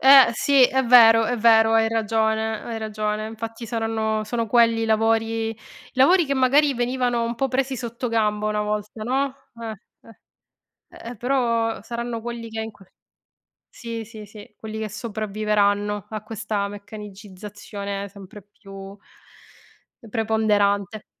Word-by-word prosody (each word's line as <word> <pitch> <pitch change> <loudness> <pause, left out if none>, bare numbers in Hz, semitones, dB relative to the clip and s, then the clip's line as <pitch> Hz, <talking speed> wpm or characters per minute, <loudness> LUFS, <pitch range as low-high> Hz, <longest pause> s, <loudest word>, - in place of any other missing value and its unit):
Eh 270 -1 +8
sì, 275 +3 +3
è 265 +1 +3
vero, 225 -2 +7
è 245 +2 -1
vero, 225 0 +5
hai 225 0 +4
ragione, 220 0 0
hai 230 -1 -5
ragione, 215 0 -3
infatti 225 +1 -7
saranno 225 -1 -1
sono 230 +1 -2
quelli 230 0 +3
i - - +1
lavori 225 0 +1
i 225 - -8 0.4
lavori 325 +8 +5
che 280 -1 -1
magari 275 +3 +4
venivano 245 -1 0
un 235 +1 -2
po' 270 +3 -1
presi 265 +1 -1
sottogamba 225 -3 -1
una 210 0 0
volta, 210 +1 -4
no. 265 +4 -1 0.3
Eh, 225 -1 -5 1.0
eh. - - -15
Ehm, 240 0 -7
però, 230 -3 0
saranno 235 +1 -5
quelli 235 0 -6
che 225 0 -6
in 220 0 -6
qual 195 -3 -20 0.8
sì, 230 -2 -7
sì, 215 -1 -11
sì, 210 0 -14
quelli 220 0 -7
che 220 -1 -4
sopravviveranno 210 -1 -1
a 215 -1 -5
questa 215 -2 -3
meccanicizzazione 200 -1 -8
sempre 200 +1 -12
più 195 -1 -12 1.2
preponderante. 215 -2 0
225 Hz, 140 wpm, -23 LUFS, 210-235 Hz, 1.2 s, Eh